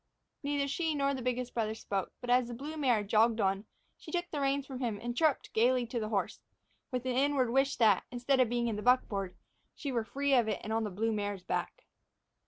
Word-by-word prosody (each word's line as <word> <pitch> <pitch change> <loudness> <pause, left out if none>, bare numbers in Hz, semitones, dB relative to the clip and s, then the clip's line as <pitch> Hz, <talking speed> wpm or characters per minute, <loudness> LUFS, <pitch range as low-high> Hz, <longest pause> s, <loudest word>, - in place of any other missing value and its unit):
Neither 285 0 0
she 315 +2 -1
nor 280 -1 +1
the 265 - -4
biggest 250 0 -2
brother 220 -2 -1
spoke, 195 -3 -3
but, 245 -1 -2
as 250 -1 +4
the 240 - -6
blue 290 +6 -6
mare 250 -8 +2
jogged 220 +2 +3
on, 195 0 +1 0.3
she - - -10
took 350 -1 -2
the 295 - -2
reins 275 0 +1
from 265 -3 -7
him 235 -5 -1
and 240 0 -4
chirruped 310 -1 +1
gaily 245 +2 +3
to 235 +1 -3
the 215 -1 -3
horse, 205 -3 -1 0.5
with 250 -1 -3
an 255 -1 0
inward 270 -2 +2
wish 270 +2 +2
that, 215 -5 +4
instead 250 +2 +1
of 250 -3 +4
being 240 0 0
in 220 -3 -1
the - - -4
buckboard, 205 -6 +1 0.4
she 280 - -4
were 235 -3 0
free 280 +4 -1
of 240 -4 +4
it 210 -3 -1
and 220 - -3
on 225 0 +1
the - - -2
blue 220 +4 -1
mare's 205 -3 -3
back. - - -3
245 Hz, 230 wpm, -32 LUFS, 220-275 Hz, 0.5 s, as